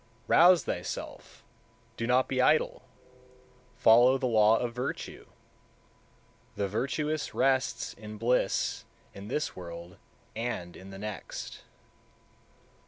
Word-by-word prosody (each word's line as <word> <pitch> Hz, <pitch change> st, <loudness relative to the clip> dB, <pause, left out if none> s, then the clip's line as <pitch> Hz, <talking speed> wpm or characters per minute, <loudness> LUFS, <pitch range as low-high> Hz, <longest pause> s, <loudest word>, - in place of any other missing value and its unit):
168. -, -, -26 dB
Rouse 175 Hz, -1 st, +7 dB
thyself! -, -, -6 dB, 0.5 s
do 115 Hz, -, -3 dB
not 125 Hz, +1 st, +3 dB
be 130 Hz, -1 st, 0 dB
idle! 150 Hz, +4 st, +2 dB, 0.9 s
Follow 120 Hz, +3 st, +6 dB
the 130 Hz, -, -3 dB
law 110 Hz, -2 st, +4 dB
of 120 Hz, 0 st, -3 dB
virtue! 125 Hz, +2 st, -5 dB, 1.3 s
The 100 Hz, -, -1 dB
virtuous 145 Hz, +8 st, -2 dB
rests 130 Hz, -4 st, +1 dB
in 105 Hz, +1 st, -10 dB
bliss 120 Hz, +3 st, 0 dB, 0.3 s
in 100 Hz, +1 st, -9 dB
this 150 Hz, +6 st, -2 dB
world 85 Hz, 0 st, -9 dB, 0.4 s
and 110 Hz, -7 st, -4 dB
in 95 Hz, -, -12 dB
the 95 Hz, -, -9 dB
next. 105 Hz, +1 st, -7 dB
115 Hz, 110 wpm, -29 LUFS, 105-130 Hz, 1.3 s, Rouse